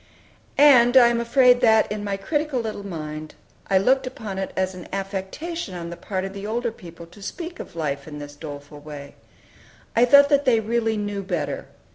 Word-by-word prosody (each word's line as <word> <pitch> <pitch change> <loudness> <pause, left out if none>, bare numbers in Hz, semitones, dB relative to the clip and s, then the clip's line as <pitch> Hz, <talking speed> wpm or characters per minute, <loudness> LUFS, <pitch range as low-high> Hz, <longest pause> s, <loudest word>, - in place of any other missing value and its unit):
And 265 -3 +7
I 240 -2 +8
am 235 0 0
afraid 245 +1 +4
that 220 -3 +4
in 210 -1 -3
my 200 -1 -2
critical 295 +6 -1
little 215 -3 -4
mind 155 -4 -7 0.3
I 195 - +4
looked 260 +7 +2
upon 205 -6 -6
it 190 - -3
as 190 0 0
an 180 -1 -10
affectation 195 - -5
on 170 -1 -6
the - - -6
part 190 +1 -4
of 195 - -6
the 200 +1 -6
older 235 +2 -1
people 170 -5 -12
to 175 +4 -17
speak 345 - -7
of - - -9
life 140 -3 -3
in 150 -1 -8
this 145 0 -9
doleful 145 -1 -9
way. 145 -1 -10 0.8
I 235 - +5
thought 280 +3 +7
that 285 -1 +3
they 240 -4 +4
really 225 0 0
knew 205 -1 -3
better. 170 -7 -3
200 Hz, 195 wpm, -23 LUFS, 170-245 Hz, 0.8 s, I